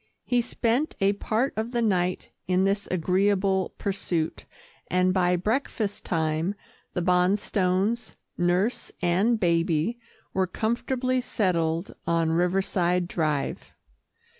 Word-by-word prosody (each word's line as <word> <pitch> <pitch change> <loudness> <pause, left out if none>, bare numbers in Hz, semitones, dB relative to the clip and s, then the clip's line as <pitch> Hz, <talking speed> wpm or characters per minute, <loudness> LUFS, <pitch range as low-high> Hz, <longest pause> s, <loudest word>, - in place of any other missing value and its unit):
He 245 -1 +2
spent 245 +4 0
a 195 +1 +3
part 225 +6 -1
of 220 +3 -3
the 240 - +1
night 180 -4 0 0.2
in 185 +1 +2
this 200 +1 0
agreeable 190 +2 +1
pursuit, 180 -5 -2 0.4
and 185 0 +2
by 180 -1 +3
breakfast 215 +1 -2
time 160 +3 0 0.4
the 180 - 0
Bonstones, 185 +4 +1 0.2
nurse 180 +7 0
and 195 +7 +2
baby 170 +4 +1 0.3
were 190 -1 +1
comfortably 250 +5 -1
settled 170 -6 0
on 165 -1 +2
Riverside 180 0 +1
Drive. 155 -5 -2
185 Hz, 110 wpm, -26 LUFS, 175-215 Hz, 0.4 s, a